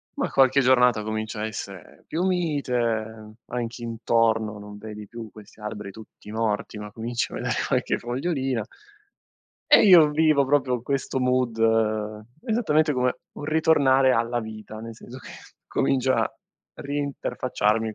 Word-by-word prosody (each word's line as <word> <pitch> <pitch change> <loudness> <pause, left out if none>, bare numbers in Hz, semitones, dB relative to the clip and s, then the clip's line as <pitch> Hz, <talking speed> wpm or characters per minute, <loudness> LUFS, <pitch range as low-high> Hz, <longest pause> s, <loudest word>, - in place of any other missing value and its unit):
ma - - -1
qualche 135 0 +4
giornata 125 -4 +4
comincia 110 0 -4
a - - -1
essere 100 -4 -9
più 165 +3 -2
mite, 120 - -1
anche 120 0 -4
intorno 115 -2 0
non 105 0 -10
vedi 105 0 -9
più 115 +1 -9
questi 110 0 -15
alberi 105 -1 -6
tutti 105 0 -13
morti 110 -1 -2
ma 105 0 -7
cominci 115 +2 -3
a - - -4
vedere - - -2
qualche - - 0
fogliolina 130 -1 -2 1.1
E - - +8
io 170 -6 +8
vivo 155 -2 +3
proprio 130 -3 +1
questo 135 0 -2
mood, 125 -2 +1 0.9
esattamente 160 - +2
come 125 -1 0
un - - -8
ritornare 145 -4 +4
alla 115 +1 0
vita, 110 -1 -8
nel 115 0 -8
senso 120 +3 -11
che - - -12 0.4
comincio 130 -1 +1
a - - +1 0.4
ri-interfacciarmi 125 -6 -1
120 Hz, 135 wpm, -25 LUFS, 110-135 Hz, 1.1 s, E